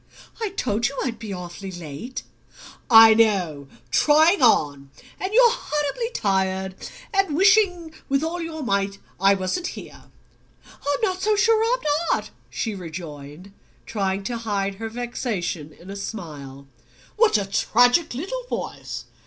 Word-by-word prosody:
"I 440 - -1
told 240 - -1
you 275 - -7
I'd 235 -4 -4
be 220 -3 -7
awfully 180 +1 -7
late." 175 - -7 0.7
"I 225 -1 +9
know 185 -11 +1 0.2
trying 315 - +4
on! 145 - +3 0.3
And 375 - -3
you're 475 +1 +6
horribly 300 - -2
tired, 190 -1 0 0.4
and 390 -6 +1
wishing 370 -4 +3 0.2
with 275 +2 +1
all 340 +2 -3
your 320 -2 -5
might 200 -3 0 0.2
I 195 +1 +5
wasn't 190 - -2
here." - - -11 0.6
"I'm 285 0 -4
not 375 -3 0
so 425 +1 +2
sure 440 +2 +3
I'm - - -11 0.3
not!" - - -1 0.2
she 225 - -3
rejoined, 165 -1 -9 0.3
trying 195 -2 -2
to 235 +4 -3
hide 200 -3 -2
her 225 - -3
vexation 220 - -4
in 180 +5 -12
a - - -6
smile. 150 -10 -7 0.5
"What 450 - +4
a 200 - -1
tragic 245 - +3
little 485 - -4
voice! - - -5
225 Hz, 140 wpm, -23 LUFS, -, 0.7 s, I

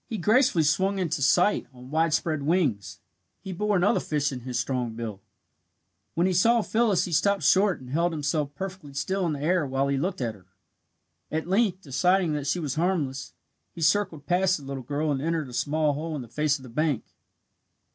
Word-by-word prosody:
He 225 - -4
gracefully 210 - +3
swung 190 +6 +1
into 170 -6 -1
sight 180 +8 +3
on 125 +1 -13
wide 160 +1 +2
spread 155 -1 0
wings. 120 - 0 0.4
He 190 - -7
bore 210 +2 +1
another 180 +3 +3
fish 145 -1 -1
in 130 - -5
his 125 0 -4
strong 120 -2 -2
bill. 110 -4 -6 0.9
When 170 - +2
he 185 - +2
saw 230 +6 +4
Phyllis 215 -6 +2
he 180 - -6
stopped 200 +5 +2
short 195 0 +3
and 125 -1 -11
held 170 +4 +1
himself 145 -1 -2
perfectly 185 -5 -7
still 185 +6 -1
in 160 - -1
the 140 - -5
air 175 +1 +2
while 135 +1 0
he 140 -1 0
looked 180 +5 -2
at 120 -4 -2
her. 95 -3 -19 0.8
At 160 +1 -2
length, 195 0 +1
deciding 175 +5 +2
that 145 -1 -3
she 135 - +1
was 150 -5 -2
harmless, 155 -5 -1 0.4
he 170 - -8
circled 170 -3 +1
past 185 +2 +2
the 145 - -12
little 135 -1 -5
girl 145 +4 -2
and 135 -2 -1
entered 160 -3 -1
a - - -11
small 150 +3 +1
hole 155 +2 -4
on 140 - -4
the - - -12
face 150 +4 0
of 135 - -15
the 130 - -10
bank. 150 0 0
155 Hz, 205 wpm, -26 LUFS, 140-185 Hz, 0.9 s, saw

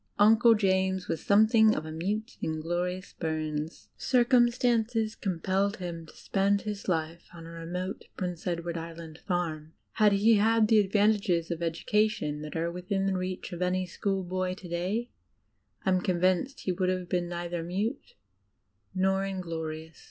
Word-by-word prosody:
Uncle 225 +3 +6
James 190 -2 +1
was 160 - -3
something 220 +1 +5
of 155 - -3
a 155 - -6
"mute, 205 +8 -3
inglorious" 175 +4 -3
Bums. 155 -1 -4
Circumstances 240 -3 +2
compelled 195 +2 -1
him 170 -3 -6
to - - -16
spend 200 +1 +1
his 210 -1 -5
life 165 -1 -2
on 165 -1 -10
a 165 - -9
remote 175 +3 -5
Prince 180 -2 -4
Edward 170 -1 -2
Island 165 -1 -9
farm; 160 -4 -2 0.2
had 210 -2 +4
he 215 +3 +5
had 220 +1 +4
the 220 -1 +5
advantages 200 -4 +2
of 170 0 -3
education 170 -2 0
that 150 0 -7
are 165 +1 -1
within 195 +2 -1
reach 185 0 -4
of 175 - -6
any 185 +1 +1
schoolboy 185 0 -2
to 190 -2 -11
day, 185 +8 -2 0.7
I - - +2
am 185 -1 +2
convinced 185 +8 +1
he 185 - -1
would 185 0 0
have 185 -1 -2
been 175 -1 -1
neither 175 0 -3
mute 200 - -3 0.8
nor 190 +1 +2
inglorious. 160 -4 -5
185 Hz, 150 wpm, -29 LUFS, 170-205 Hz, 0.8 s, Uncle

